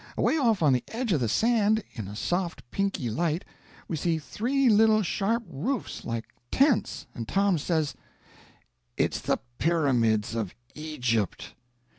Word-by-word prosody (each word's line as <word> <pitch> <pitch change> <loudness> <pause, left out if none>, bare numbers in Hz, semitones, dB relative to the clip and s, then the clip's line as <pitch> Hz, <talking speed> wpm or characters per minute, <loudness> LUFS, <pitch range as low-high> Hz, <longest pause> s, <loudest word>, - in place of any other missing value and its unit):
Away - - +2
off 225 - +2
on 145 -3 +5
the 125 - +1
edge 235 -1 -2
of 155 - +2
the 120 -3 0
sand, 220 - +3
in 110 -5 -6
a 100 - -7
soft 175 - -2
pinky 195 -10 -1
light, 160 - -1 0.4
we 165 - -2
see 165 +1 0
three 255 - 0
little 215 -1 +5
sharp 220 +6 0
roofs 215 - -3
like 115 -1 -3 0.2
tents, 275 -4 +2
and 115 -2 -6
Tom 195 - +2
says: 155 -1 0 1.0
"It's - - +1
the - - +1 0.2
pyramids 120 -11 +2
of 110 -5 -3 0.2
Egypt." 125 - -2
170 Hz, 145 wpm, -27 LUFS, -, 1.0 s, on